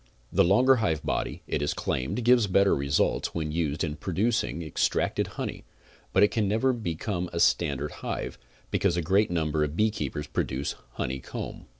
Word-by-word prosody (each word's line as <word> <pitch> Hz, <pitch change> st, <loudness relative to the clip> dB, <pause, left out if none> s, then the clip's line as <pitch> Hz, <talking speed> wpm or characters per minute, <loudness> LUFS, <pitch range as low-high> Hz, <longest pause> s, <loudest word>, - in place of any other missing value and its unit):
The -, -, +5 dB
larger 125 Hz, +9 st, +5 dB
hive 80 Hz, -9 st, 0 dB
body, -, -, -2 dB
it -, -, -2 dB
is 75 Hz, -, -1 dB
claimed, 70 Hz, -, -2 dB
gives 120 Hz, -3 st, +5 dB
better 100 Hz, +1 st, +4 dB
results 70 Hz, 0 st, 0 dB
when 80 Hz, -2 st, -2 dB
used 80 Hz, -1 st, -1 dB
in 75 Hz, -2 st, -3 dB
producing 95 Hz, +1 st, 0 dB
extracted 80 Hz, -, 0 dB
honey, -, -, -4 dB, 0.5 s
but 95 Hz, -, +4 dB
it 105 Hz, -, +4 dB
can 110 Hz, -4 st, +1 dB
never 110 Hz, +6 st, +2 dB
become 90 Hz, -3 st, -3 dB
a 85 Hz, -, -3 dB
standard 75 Hz, -4 st, +2 dB
hive, -, -, -4 dB, 0.3 s
because 90 Hz, -3 st, +1 dB
a 85 Hz, -, 0 dB
great 100 Hz, +6 st, +3 dB
number 80 Hz, -3 st, 0 dB
of 75 Hz, +1 st, -2 dB
beekeepers 85 Hz, -9 st, -1 dB
produce 70 Hz, +2 st, -2 dB
comb -, -, -22 dB, 0.4 s
honey. -, -, -7 dB
85 Hz, 170 wpm, -27 LUFS, 75-105 Hz, 0.5 s, The